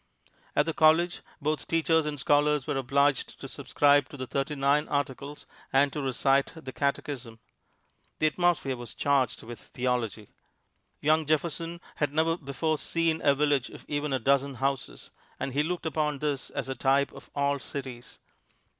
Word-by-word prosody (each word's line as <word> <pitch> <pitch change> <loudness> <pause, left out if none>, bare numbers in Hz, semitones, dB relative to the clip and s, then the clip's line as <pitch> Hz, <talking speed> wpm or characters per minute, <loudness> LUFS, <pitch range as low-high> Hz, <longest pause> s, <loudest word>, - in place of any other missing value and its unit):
At 150 - +4
the 165 - -1
college, 160 +3 +4 0.2
both 150 -1 -2
teachers 160 -1 +2
and 145 -1 -3
scholars 145 0 +3
were - - -2
obliged 135 +1 +1
to - - -7
subscribe 145 0 +2
to 145 - -10
the 130 - -4
Thirty 140 +3 -2
nine 140 +2 +2
Articles 145 0 -3 0.3
and 140 +1 +3
to 150 - -3
recite 135 +1 +2
the 145 -5 -8
Catechism. 135 -4 -2 0.8
The - - +1
atmosphere 155 -4 +2
was 120 -2 -9
charged 140 -4 +1
with 120 +1 -8
theology. 125 -4 -2 0.7
Young 155 0 +3
Jefferson 165 +2 -1 0.2
had 145 -2 0
never 160 +2 +2
before 155 0 -2
seen 165 -1 0
a 140 - +4
village 145 -2 +1
of - - -12
even 145 0 -2
a 135 - +2
dozen 140 +2 +2
houses, 135 +1 -3 0.3
and 135 - -3
he 145 - +2
looked 175 +3 -2
upon 150 -2 0
this 145 -2 -2
as - - -4
a 135 - -2
type 135 +1 +2
of - - -13
all 140 0 +1
cities. 130 -3 -7
145 Hz, 165 wpm, -28 LUFS, 135-155 Hz, 0.8 s, At